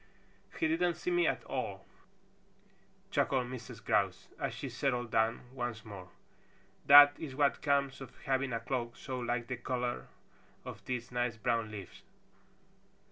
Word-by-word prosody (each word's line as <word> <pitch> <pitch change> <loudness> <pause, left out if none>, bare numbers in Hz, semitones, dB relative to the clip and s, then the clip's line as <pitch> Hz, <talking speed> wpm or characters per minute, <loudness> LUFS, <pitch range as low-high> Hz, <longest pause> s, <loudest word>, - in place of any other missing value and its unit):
"He 320 - +3
didn't 180 - +1
see 180 - -3
me 175 -2 +3
at - - 0
all," - - -4 1.3
chuckled 130 -2 +2
Mrs. 125 -3 -8
Grouse, 100 -3 +1
as - - -1
she - - -5
settled 120 -4 -1
down 110 +1 +2
once 120 -4 -4
more. 95 -3 -9 0.8
"That 145 0 +11
is 140 -5 -6
what 140 0 +2
comes 140 -1 +1
of 130 -2 -10
having 135 -1 +1
a 115 - -1
cloak 120 -1 -3
so 130 -2 -5
like 120 -1 -1
the 125 0 -4
color 125 0 -2 0.6
of - - -8
these 125 -2 -4
nice 120 -2 -1
brown 115 -2 0
leaves. 100 -4 -9
125 Hz, 145 wpm, -33 LUFS, 115-135 Hz, 1.3 s, That